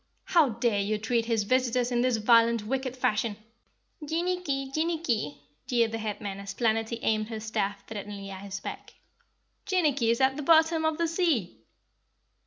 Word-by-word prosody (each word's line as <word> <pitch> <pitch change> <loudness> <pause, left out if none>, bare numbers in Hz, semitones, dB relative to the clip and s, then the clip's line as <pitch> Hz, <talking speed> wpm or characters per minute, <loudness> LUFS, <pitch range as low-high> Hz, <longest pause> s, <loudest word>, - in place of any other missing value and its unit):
How 325 -6 +4
dare 230 -2 0
you 210 +2 0
treat 230 +2 0
his 230 -2 +1
visitors 250 +1 +1
in 240 0 +2
this 250 -2 +2
violent 230 0 +4
wicked 260 +2 -2
fashion?" 215 -3 0 0.7
"Jinnicky! 320 -4 -2
Jinnicky!" 310 - -1 0.3
jeered 235 -2 +2
the 225 - -3
Headman 205 -2 -4
as 200 0 -7
Planetty 225 0 0
aimed 215 0 +1
her 220 -2 -4
staff 205 -2 -3
threateningly 205 -2 -7
at 190 0 -8
his 195 -1 -6
back. - - -8 0.7
"Jinnicky 295 -11 +2
is 235 - +2
at 265 +1 +3
the - - -3
bottom 320 +1 +4
of 315 -1 +1
the 335 0 +1
sea!" 320 - 0
235 Hz, 160 wpm, -28 LUFS, 215-280 Hz, 0.7 s, How